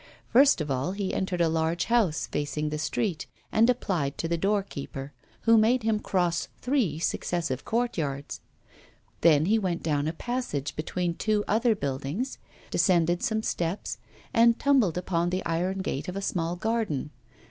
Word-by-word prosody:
First 270 - +5
of 150 -2 -3
all 135 +8 -1
he 200 -1 -2
entered 185 -2 -1
a 170 - +4
large 160 +1 0
house 220 -10 +2
facing 150 +1 -2
the 150 0 -3
street, 160 +3 -2 0.2
and 230 +2 +4
applied 175 - 0
to 165 - -2
the 170 - 0
doorkeeper, 165 -7 -2 0.3
who 230 -1 +5
made 235 +3 +3
him 220 -1 +1
cross 175 -4 0
three 250 - 0
successive 160 -4 -2
courtyards; 160 - -2 0.8
then 155 -2 +5
he 220 +4 +3
went 180 -4 -2
down 150 -2 0
a 160 - -1
passage, 205 - -3
between 170 +2 -2
two 210 +3 0
other 225 +2 +3
buildings, 140 - -3 0.3
descended 175 -2 +3
some 220 0 0
steps, 175 +1 -2 0.3
and 230 0 +5
tumbled 255 - +3
upon 175 -1 0
the 185 +1 -2
iron 180 +4 -1
gate 140 -6 -3
of 180 - -4
a 195 - -3
small 170 -2 -1
garden. 205 - -1
175 Hz, 160 wpm, -27 LUFS, 155-220 Hz, 0.8 s, First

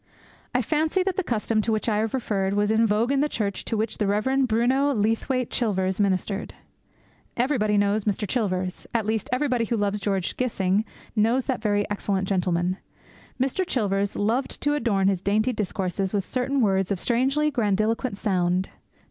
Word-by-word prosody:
I 250 - +3
fancy 315 - +1
that 380 -1 -1
the 380 - 0
custom 225 -4 0
to 225 - -1
which 215 +1 -1
I 215 -2 +2
have 220 +3 -1
referred 200 -6 -1
was 205 +1 +2
in 225 +1 +3
vogue 220 +5 +1
in 280 - +2
the 300 - +1
church 200 -6 -2
to 225 - -1
which 215 0 -2
the 210 - +1
Rev. 260 +7 +1
Bruno 250 +5 +2
Leathwaite 225 +4 0
Chilvers 190 -5 0
ministered. 200 0 -1 0.8
Everybody 235 -5 +2
knows 205 +1 +1
Mr. 210 0 -1
Chilvers; 185 -6 -2
at 225 -2 +1
least 220 -1 -1
everybody 250 -3 +1
who 235 0 -1
loves 205 0 0
George 195 -2 -1
Gissing 205 -4 +1 0.3
knows 230 +4 +2
that 260 -5 -2
very 205 -2 +1
excellent 195 -2 -1
gentleman. 180 -1 0 0.6
Mr. 270 +9 +1
Chilvers 200 - -1
loved 230 +6 -1
to 290 - +2
adorn 220 -9 +1
his 195 -3 +1
dainty 215 +5 +1
discourses 195 -1 -2
with 195 -2 0
certain 265 +2 0
words 195 -3 +2
of 195 -3 -1
strangely 270 +7 +1
grandiloquent 220 -1 0
sound. 185 -2 0
215 Hz, 175 wpm, -25 LUFS, 200-250 Hz, 0.8 s, I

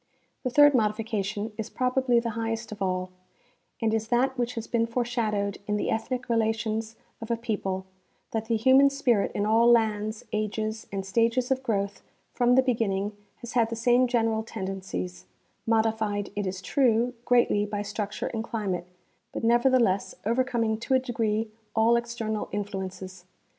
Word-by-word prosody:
The 255 - -1
third 290 +3 +6
modification 215 -2 -1
is 220 - -3
probably 255 -1 +2
the 235 -1 -2
highest 225 0 -3
of 210 -1 -8
all, 185 -1 -1 0.7
and 225 -2 +1
is 220 0 0
that 255 +3 +2
which 245 -1 -2
has 230 -1 -4
been 230 -1 0
foreshadowed 225 -4 -1
in 210 0 0
the - - -1
ethnic 250 +3 -2
relations 225 -1 0 0.3
of 225 - -7
a 235 - +1
peo^jle; 200 -5 -2 0.5
that 225 -1 -2
the 230 0 0
human 260 +5 +6
spirit 255 -7 +1
in 205 - 0
all 225 +2 +4
lands, 215 -2 +2
ages, 215 +1 -2
and 195 -1 -3
stages 230 +5 +1
of 260 0 +2
growth 200 -5 -2 0.3
from 245 0 +3
the 260 - +5
beginning 210 -5 0 0.3
has 240 - -7
had 230 -2 +3
the 230 - -3
same 245 +2 +3
general 225 -2 +1
tendencies, 190 -4 -5 0.4
modified, 220 -2 +1
it 205 -1 -2
is 185 0 -5
true, 245 0 +2
greatly 240 -4 +3
by 205 0 -3
structure 205 0 -4
and 225 -1 -2
climate, 195 -7 -3 0.4
but - - -5
never 240 +3 +4
theless 230 -7 +2
overcoming 230 -2 +1
to 260 +3 +1
a - - +5
degree 225 -3 -1 0.3
all 225 +1 +4
external 235 -2 -2
influences. 190 -2 -5
225 Hz, 160 wpm, -27 LUFS, 205-240 Hz, 0.7 s, third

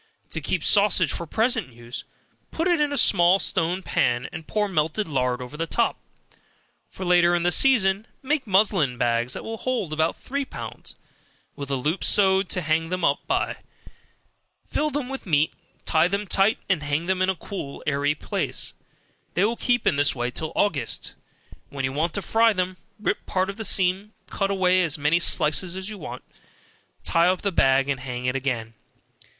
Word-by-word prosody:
To - - -3
keep - - -1
sausage 200 -5 +3
for 170 - -4
present 220 - 0
use, 120 +1 -8 0.4
put 330 +2 -1
it 345 -4 +2
in 290 -1 0
small 180 -5 +5
stone 180 0 -1
pans, 125 -5 0
and 160 -2 -8
pour 210 -1 0
melted 165 +3 -1
lard 125 -3 -1
over 125 +4 -10
the 165 +2 -3
top; 235 +7 0 0.9
for 190 - -7
later 175 -1 +4
in 170 - 0
the 175 - +2
season, 215 -4 +3 0.2
make 275 -2 -1
muslin 190 - +2
bags 120 +1 +1
that - - -6
will 225 0 -5
hold 235 -10 -2
about 160 +1 0
three 280 +2 -3
pounds, - - -9 0.6
with 140 -2 -7
a 140 - 0
loop 150 +8 -1
sewed 190 -1 +5
on - - -28
to 180 - -1
hang 160 0 0
them 185 0 -1
up - - +2
by; - - 0 1.1
fill 305 +1 0
them 285 -3 -3
with 270 -5 -7
meat, 155 -2 +2 0.3
tie 160 +1 +4
them 200 +3 -2
tight, 195 +3 +3
and 185 -6 +1
hang 145 +3 -1
them 185 0 0
in 185 - +2
a 190 - +1
cool 165 -5 -7
airy 145 0 +1
place; - - -3 0.6
they 180 - +3
will 230 +2 0
keep 245 0 0
in 140 - +2
this 145 -1 +2
way 120 0 -2
till 155 +4 -3
August, 145 - -1 0.6
when 135 -1 -3
you 130 - -3
want 160 +4 0
to 200 - -2
fry 225 0 +3
them, 185 -1 -2 0.2
rip 210 - -1
part 190 0 0
of 200 - -15
the 220 - -4
seam, 195 +2 +1 0.2
cut 195 -1 -1
out 190 -2 -1
as 180 -3 +3
many 150 +4 +2
slices 170 +2 +2
as 190 +2 -3
you 210 - -7
want, 155 - -8 0.8
tie 170 +1 +3
up 185 0 +1
the 200 - 0
bag 135 -4 +3
and 140 -2 -1
hang 125 -1 -5
it - - +2
up 125 - -3
again. 120 -4 -2
180 Hz, 190 wpm, -24 LUFS, 145-200 Hz, 1.1 s, small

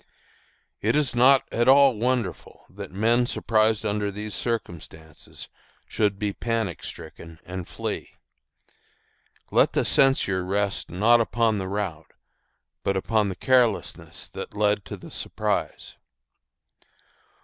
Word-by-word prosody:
It 110 +5 +1
is 150 -4 +1
not 130 +2 +5
at 120 +1 +1
all 135 -1 +6
wonderful 120 -4 -3
that 100 +1 -9
men 115 +5 +2
surprised 110 -2 +1
under 105 0 -1
these 105 +1 -6
circumstances 80 -8 -6 0.4
should 105 -2 0
be 105 0 -2
panic 115 -7 -3
stricken 80 -1 -10
and 90 -1 -6
flee. - - -5 1.4
Let - - +3
the - - +1
censure 100 -9 +2
rest 100 +2 -2
not 115 +7 +4
upon 115 -2 +1
the 95 - -4
rout, 95 -5 -4 0.7
but 100 0 0
upon 105 +1 +1
the 95 - -5
carelessness 125 -1 0
that - - -8
led 105 -1 +1
to - - -7
the - - -12
surprise. - - -3
105 Hz, 120 wpm, -25 LUFS, 95-120 Hz, 1.4 s, all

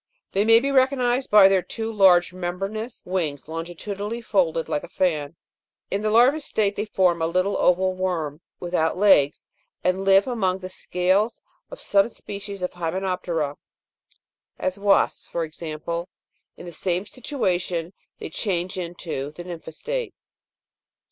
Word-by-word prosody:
They 200 +2 +1
may 225 0 +7
be 275 +3 -1
recognised 260 -1 +2
by 205 -2 +8
their 195 -1 +3
two 225 +4 -5
large 185 -3 +5
membranous 195 +6 -4
wings, 165 -7 -2
longitudinally 195 +7 -5
folded 175 -7 +1
like 145 - -1
a - - -8
fan. 155 -4 -1 0.6
In 200 - 0
the 215 - 0
larva 250 +8 +5
state 210 -8 0
they 210 - -2
form 180 -5 +2
a 160 - +2
little 185 +4 +1
oval 185 +1 +3
worm, 170 -5 -2 0.2
without 175 -2 0
legs, 180 -8 +4 0.4
and 185 +1 +1
live 195 0 +5
among 195 -7 0
the 185 -1 -8
scales 185 +6 0 0.3
of - - -9
some 200 0 +3
species 200 -3 -8
of 180 - -1
Hymenop'terse, 170 -4 -2 1.0
as 185 +2 -2
wasps, 200 -1 +2
for 170 - -2
example; 165 +2 -5 0.5
in - - -10
the 175 - -7
same 180 +3 -2
situation 185 - -2 0.2
they - - -7
change 185 0 -2
into 170 -5 -4
the 175 - -8
nympha 170 -2 -8
state. - - -4
185 Hz, 145 wpm, -24 LUFS, 170-205 Hz, 1.0 s, by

